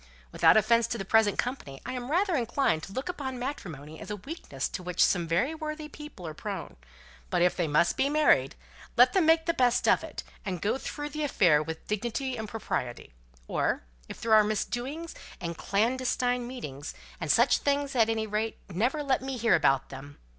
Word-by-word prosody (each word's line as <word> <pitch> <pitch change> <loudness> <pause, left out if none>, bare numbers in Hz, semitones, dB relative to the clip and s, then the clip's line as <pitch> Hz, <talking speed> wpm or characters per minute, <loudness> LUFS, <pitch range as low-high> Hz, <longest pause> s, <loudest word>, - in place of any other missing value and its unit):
Without - - +5
offence 230 +2 +4
to 235 - -3
the 195 - -5
present 220 0 +3
company, 240 - -3
I - - -4
am 250 0 -5
rather 360 +3 +2
inclined 235 - +1
to - - -12
look 260 - -4
upon 275 -8 -4
matrimony 160 - -6
as - - -9
a 210 - -2
weakness 205 - -5
to - - -5
which 180 0 +2
some 175 -2 +1
very 175 - +1
worthy 310 -1 -5
people 295 - -10
are 155 - -5
prone; 195 +2 -6 0.5
but 175 - +2
if 180 - +3
they 175 - 0
must 150 +3 +2
be 275 - +2
married, 305 +1 +3 0.4
let - - +7
them 370 -5 +3
make 325 0 +5
the 335 - +1
best 245 -4 +2
of - - +4
it, - - -7 0.2
and 185 -4 -3
go 210 +8 0
through 295 +1 -5
the 305 +1 -5
affair 180 - +4
with 160 +1 -6
dignity 240 +5 -2
and 220 -3 -5
propriety: 125 - -4 0.3
or - - 0 0.3
if - - -8
there 225 -1 +1
are 215 -1 +8
misdoings 245 +10 -3 0.3
and 170 -2 -5
clandestine 245 +3 0
meetings, 150 - -7 0.2
and 160 - -4
such 245 +1 +4
things, 280 -1 0
at 225 -2 +4
any 220 -1 0
rate, 215 +1 -2
never 245 - 0
let 270 -3 +1
me 265 -1 -4
hear 230 -2 +3
about 135 -5 +3
them! 140 +1 -10
230 Hz, 195 wpm, -28 LUFS, 180-270 Hz, 0.5 s, are